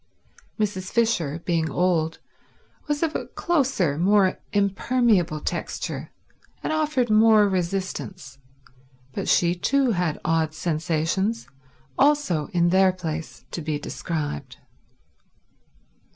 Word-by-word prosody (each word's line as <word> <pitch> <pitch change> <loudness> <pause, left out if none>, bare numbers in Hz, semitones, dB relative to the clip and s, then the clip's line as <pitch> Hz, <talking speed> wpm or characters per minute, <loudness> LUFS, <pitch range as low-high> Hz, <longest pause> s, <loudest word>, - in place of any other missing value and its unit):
Mrs. 195 -3 -2
Fisher, 175 -10 0
being 165 -3 0
old, 165 0 +1 0.7
was 295 +1 -1
of 320 -1 -1
a - - -3
closer, 260 - 0
more 195 +1 +3
impermeable 200 -4 +2
texture, - - -4 0.5
and - - -1
offered 300 -7 +1
more 215 -1 +6
resistance; 185 -5 -3 0.7
but - - -3
she 170 0 +4
too 260 +8 +1
had 175 -6 -1
odd 160 -1 +1
sensations, 165 +7 -1 0.5
also 280 - +2
in 175 -1 +2
their 190 +1 +5
place 165 -3 -6
to 170 - -4
be 150 -1 -2
described. 150 - -5
185 Hz, 105 wpm, -24 LUFS, 160-220 Hz, 0.7 s, more